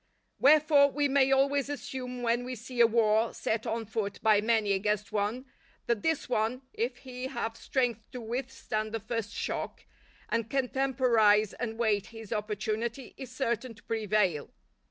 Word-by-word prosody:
Wherefore 290 -1 +6
we 290 +1 +1
may 270 -1 +3
always 275 +1 +2
assume 250 -2 -5
when 235 +1 +1
we 255 +1 -5
see 240 +1 -2
a 235 - +8
war 225 0 +2
set 225 +2 -2
on 225 0 -2
foot 205 -2 -3
by 215 -2 +5
many 220 -2 +2
against 210 +1 -1
one, 215 +5 -1 0.4
that 235 -3 0
this 320 -2 0
one, 245 +2 0
if 245 +2 -2
he 255 0 -5
have 235 -4 -3
strength 240 -5 -1
to 250 - -6
withstand 230 -2 -4
the 225 - -1
first 220 -1 -4
shock, - - -4 0.4
and 230 -1 -1
can 265 -1 0
temporize 235 -6 +3
and 225 -2 -4
wait 215 -4 +1
his 225 -2 -7
opportunity, 215 +4 -3
is 260 -3 -9
certain 250 -2 -2
to 225 - -19
prevail. 210 -8 0
230 Hz, 160 wpm, -29 LUFS, 215-255 Hz, 0.4 s, a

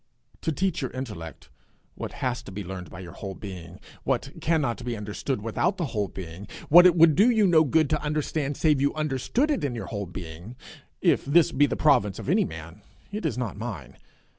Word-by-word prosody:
To 160 - -1
teach 180 +2 -1
your 130 - -2
intellect 105 - -7 0.4
what - - -6
has 125 -3 -2
to - - -11
be 100 +1 -5
learned 90 -1 -7
by 85 - -9
your 90 -2 -9
whole 95 +1 -7
being, 90 -3 -9 0.2
what - - -1
cannot 145 -7 0
be 120 -2 -3
understood 105 +3 -3
without 115 - 0
the 170 - -1
whole 105 -3 0
being, 90 +1 -8 0.2
what 175 +4 +9
it 175 - +4
would 165 -2 +7
do 205 +10 +5
you 220 -4 +4
no 165 -4 +5
good 155 +1 +3
to 150 - +1
understand 150 -1 -2
save 150 -4 +3
you 140 +2 +1
understood 155 - 0
it 245 - -1
in 135 -4 -1
your 115 - -5
whole 100 -2 -3
being 90 +5 -8 0.5
if - - +3
this 160 +3 +4
be 145 +1 +4
the - - -2
province 105 - +3
of - - -6
any - - +3
man, 85 +5 -9 0.3
it 205 -5 -2
is 125 - -3
not 125 -5 -3
mine. 100 - -6
125 Hz, 210 wpm, -26 LUFS, 100-155 Hz, 0.5 s, what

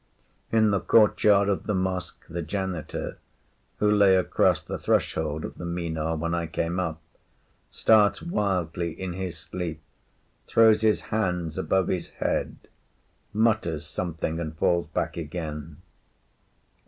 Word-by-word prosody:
In 110 -2 +4
the 100 - +2
courtyard 105 -2 +4
of 100 -2 -1
the 105 - +1
mosque 95 -1 -3
the 85 +1 -4
janitor, 90 -1 -4 0.6
who 105 0 +2
lay 100 -2 +5
across 95 - +3
the - - -6
threshold 80 -1 0
of - - -9
the - - -6
Minar 80 -2 -2
when 85 +2 -2
I 85 -1 -1
came 85 +3 -2
up, 80 -3 -2 0.7
starts 105 -2 +4
wildly 90 - -2
in 95 -2 -4
his 90 -2 -4
sleep, 80 +1 -5 0.7
throws 110 -1 +5
his 110 -1 +3
hands 90 -7 -1
above 95 -2 +1
his 90 - -1
head, - - -1 0.8
mutters 110 -8 +1
something, 80 -2 -3
and 80 -2 -5
falls 85 +1 +2
back - - -3
again. 80 -1 -6
90 Hz, 130 wpm, -26 LUFS, 80-100 Hz, 0.8 s, lay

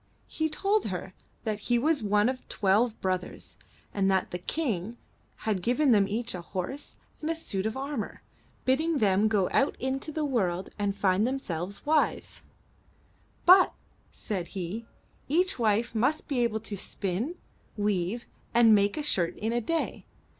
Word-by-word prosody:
He 315 0 -1
told 400 +6 +1
her - - -4 0.3
that 215 -2 -2
he 240 - +4
was 295 +3 +2
one 210 +1 +3
of 255 0 -4
twelve 215 +4 +2
brothers, 185 -1 -3 0.4
and 195 -1 +2
that 190 -1 +1
the 180 - -3
King 225 - -2 0.5
had 210 -4 0
given 250 +6 +3
them 205 -3 +5
each 230 +4 -2
a 180 - -5
horse 185 +11 -5 0.2
and 310 - -2
a 330 - +1
suit 200 -11 -2
of 220 - -4
armor, 270 -5 -4 0.4
bidding 310 +5 +2
them 205 -2 +3
go 205 -4 +2
out 275 - +2
into 265 +4 -2
the 310 0 -1
world 190 -9 0
and 200 -1 0
find 200 +2 +2
themselves 200 -8 -4
wives. 305 +1 +1 1.0
But,*' 370 +1 +8 0.4
said 185 -5 -4
he, 195 +6 -4 0.4
each 355 +3 +1
wife 225 +1 +2
must 255 +8 +1
be 275 -4 0
able 225 -2 +1
to 215 -1 -5
spin, 200 - -3 0.4
weave, 205 +2 0 0.3
and 235 -2 +7
make 205 +2 +3
a 305 - -2
shirt 175 - +1
in 220 +2 -1
a 240 - +1
day. 325 +8 -2
225 Hz, 160 wpm, -28 LUFS, 195-270 Hz, 1.0 s, But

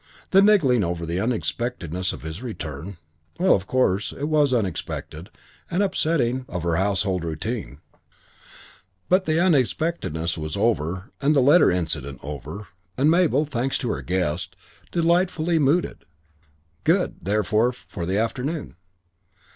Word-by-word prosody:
That 195 - +7
niggling 150 - +4
over 85 -1 -2
the 85 +2 -2
unexpectedness 110 -6 -2
of 65 - -9
his 80 +5 -6
return, 85 - -6 0.4
well, 185 +2 +4
of 95 0 0
course 110 -6 +1
it 140 - -8
was 150 -2 +2
unexpected 95 -6 -3 0.4
and 185 +4 +1
upsetting 155 -9 0
of 90 -2 -4
her 85 -1 +1
household 95 -2 0
routine; 80 - -4 1.3
but 185 +1 +3
the 155 +1 +1
unexpectedness 145 - 0
was 75 +3 -4
over 95 -3 0
and 145 +2 +3
the - - +5
letter 145 +7 +6
incident 80 -6 -1
over, 75 +9 -7 0.3
and 145 +4 +4
Mabel, 160 -4 +3
thanks 135 -2 -1
to 125 - -3
her - - -3
guest, 90 -4 -2 0.4
delightfully 170 -1 +2
mooded. 150 - +1 0.8
Good, - - +2
therefore, 105 +4 +2
for 95 -7 -7
the 95 +2 0
afternoon. 125 - -2
115 Hz, 130 wpm, -24 LUFS, -, 1.3 s, That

